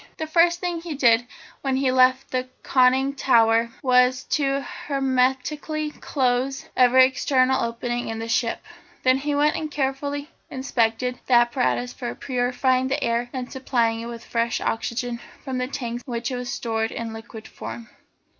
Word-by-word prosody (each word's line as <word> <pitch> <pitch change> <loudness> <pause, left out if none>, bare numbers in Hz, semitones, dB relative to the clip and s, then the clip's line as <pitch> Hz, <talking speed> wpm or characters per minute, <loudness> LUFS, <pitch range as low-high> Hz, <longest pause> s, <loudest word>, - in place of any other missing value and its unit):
The 315 - -3
first 340 +2 +3
thing 350 -2 -3
he 330 -3 -5
did 240 -3 +4 0.3
when 270 -1 0
he 265 -1 +2
left 255 +1 +3
the 255 0 -2
conning 260 +1 +3
tower 230 -3 +3
was 250 0 +4
to 275 -2 +1 0.3
hermetically 275 +3 0
close 260 -2 -1
every 255 +1 +6
external 260 -1 +2
opening 240 +1 -3
in 225 - -4
the 225 0 -5
ship. 230 0 0 0.4
Then 255 0 +4
he 290 +1 -1
went 295 +1 +3
and 310 - -3
carefully 285 +1 -2 0.2
inspected 250 -1 -1
the 255 - +1
apparatus 125 - +2
for 120 - -5
purifying 255 - 0
the 275 +1 -1
air 235 +1 0
and 255 -2 -5
supplying 235 -4 0
it 230 - -6
with 235 -1 -8
fresh 230 0 -1
oxygen 235 +1 -2 0.2
from 260 -3 -3
the 250 - -1
tanks 240 -3 -4
in - - -6
which 235 +2 -2
it - - -2
was 245 0 -5
stored 225 -3 -2
in 230 -1 -5
liquid 225 0 -10
form. 230 -1 -8
255 Hz, 165 wpm, -24 LUFS, 235-270 Hz, 0.4 s, every